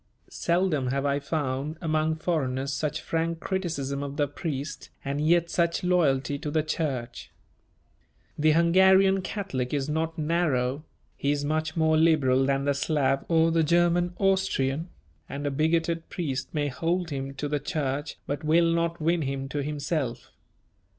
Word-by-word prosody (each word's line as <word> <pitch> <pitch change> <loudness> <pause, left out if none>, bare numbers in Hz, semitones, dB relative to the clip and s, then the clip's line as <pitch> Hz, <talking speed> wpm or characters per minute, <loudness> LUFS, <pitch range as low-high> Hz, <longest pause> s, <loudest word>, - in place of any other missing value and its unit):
Seldom 170 -6 +1
have 135 +2 -1
I 140 0 +1
found 140 0 -2
among 155 -1 0
foreigners 140 -5 -1
such 150 +2 -2
frank 165 0 -1
criticism 160 -8 -2
of 140 0 -5
the 145 -2 +2
priest 145 0 -5 0.2
and 140 +2 -2
yet 170 +2 +3
such 170 +2 +1
loyalty 145 -6 +2
to 150 - -4
the 155 +1 +1
Church. 130 -7 -3 1.1
The 155 +1 +3
Hungarian 190 +3 +5
Catholic 175 - -3
is 140 -1 -1
not 160 +2 -1
narrow; 150 -4 0 0.3
he 140 - -2
is 145 0 0
much 155 +2 -1
more 160 -1 +3
liberal 135 -5 +3
than 135 0 +1
the 145 - +2
Slav 140 -1 +1
or 165 0 +3
the 165 0 +3
German 175 +2 +2
Austrian, 185 -6 +1 0.4
and 140 +1 -5
a 145 - 0
bigoted 165 +3 0
priest 135 -7 -3
may 150 -2 0
hold 165 +5 -1
him 135 0 -4
to 145 +2 -3
the 145 0 -1
Church 145 -2 -3
but 145 +2 -4
will 165 +2 +3
not 170 0 0
win 165 +2 +1
him 135 -1 -3
to 145 0 -2
himself. 145 -3 -3
155 Hz, 155 wpm, -27 LUFS, 140-170 Hz, 1.1 s, Hungarian